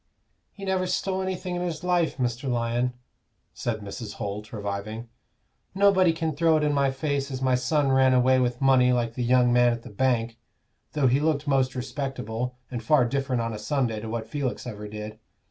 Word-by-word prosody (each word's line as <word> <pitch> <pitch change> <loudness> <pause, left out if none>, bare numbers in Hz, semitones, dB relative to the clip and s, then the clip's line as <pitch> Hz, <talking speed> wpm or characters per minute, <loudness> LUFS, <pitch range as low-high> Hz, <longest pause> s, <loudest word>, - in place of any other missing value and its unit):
"He 195 - -9
never 190 -1 0
stole 190 +1 -1
anything 185 -1 -3
in 175 - -2
his 170 -3 -3
life, 175 -2 +1
Mr. 125 +1 -2
Lyon," 120 +1 0 0.6
said 110 -2 -3
Mrs. 105 +1 -7
Holt, 105 +1 -5
reviving. 105 +2 -5 0.7
"Nobody 190 -3 +5
can 160 -2 -2
throw 160 +1 +3
it 155 - 0
in 150 -1 +2
my 140 -1 +2
face 140 +1 -2
as 130 -2 -4
my 130 -1 +1
son 135 +2 +1
ran 130 0 +5
away 130 +1 +4
with 125 -1 0
money 130 -2 +4
like 120 -2 0
the 125 - -3
young 125 0 +4
man 120 0 +5
at 120 0 -7
the - - -10
bank 115 0 0 0.5
though 150 -3 +1
he 130 +2 +4
looked 150 -1 0
most 135 -2 +2
respectable, 125 -2 -4
and 120 -2 -3
far 125 +2 +4
different 130 -1 -1
on 115 0 -3
a 105 - -6
Sunday 120 -2 -1
to 110 +1 -6
what 115 0 -4
Felix 135 0 -3
ever 105 -3 -6
did. 105 +1 -7
130 Hz, 195 wpm, -26 LUFS, 115-145 Hz, 0.7 s, Nobody